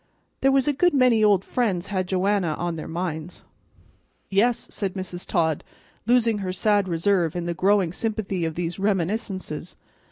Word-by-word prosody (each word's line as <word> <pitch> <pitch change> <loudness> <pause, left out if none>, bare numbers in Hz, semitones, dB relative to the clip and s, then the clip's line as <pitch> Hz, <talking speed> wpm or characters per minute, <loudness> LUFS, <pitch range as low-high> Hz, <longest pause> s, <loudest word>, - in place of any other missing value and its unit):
There 270 - +4
was 270 +1 +2
a 295 - +3
good 350 +3 +2
many 250 -4 +4
old 200 -3 +4
friends 200 -8 0
had 185 -1 0
Joanna 185 -3 +1
on 175 -1 -3
their 160 - -6
minds." 170 -1 -5 0.9
"Yes," 225 +5 +2
said 195 -2 -3
Mrs. 185 -2 -5
Todd, 160 -4 0 0.4
losing 235 -3 +3
her 185 -2 -3
sad 205 +1 +2
reserve 170 -1 +1
in 175 -1 -3
the 175 - -1
growing 190 -1 +2
sympathy 210 -4 -2
of 160 -1 -2
these 175 +1 -3
reminiscences. 190 -3 -2
190 Hz, 160 wpm, -24 LUFS, 175-215 Hz, 0.9 s, There